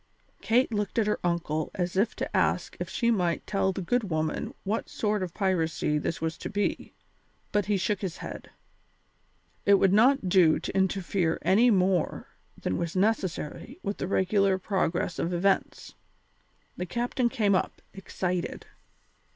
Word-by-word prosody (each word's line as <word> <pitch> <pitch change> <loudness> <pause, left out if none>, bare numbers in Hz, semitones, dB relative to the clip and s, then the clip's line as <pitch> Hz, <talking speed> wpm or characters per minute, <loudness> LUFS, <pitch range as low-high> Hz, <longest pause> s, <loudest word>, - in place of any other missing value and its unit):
Kate 240 +1 +2
looked 205 +1 -2
at 225 - +3
her 210 - 0
uncle 165 -3 -1
as 180 -1 -2
if 200 +5 +1
to - - -4
ask - - +1
if - - -4
she 235 -1 +1
might 175 -7 0
tell 195 -1 +1
the 190 0 -4
good 225 +2 0
woman 155 -1 -1
what 210 +3 -2
sort 210 -1 -1
of 185 - -2
a - - -31
piracy 165 -6 0
this 160 - -3
was 160 0 -3
to - - -5
be, 205 -1 -2 0.6
but 205 -2 +1
he 205 -1 +2
shook 190 +1 -1
his 185 -4 -4
head. - - -8 1.1
It 200 - +6
would 195 -1 +3
not 240 0 +4
do 175 -3 +5
to - - -6
interfere 190 -3 +1
any 225 +6 +5
more 185 -4 +1 0.3
than 90 - -2
was 170 0 -3
necessary 205 - -1
with 200 - -3
the - - -3
regular 195 0 +2
progress 180 -3 -1
of 170 - -1
events. 195 +3 0 0.8
The 180 - -3
captain 240 +3 0
came 215 -6 +1
up, 185 - 0
excited. 180 -2 -3
190 Hz, 160 wpm, -28 LUFS, 175-210 Hz, 1.1 s, It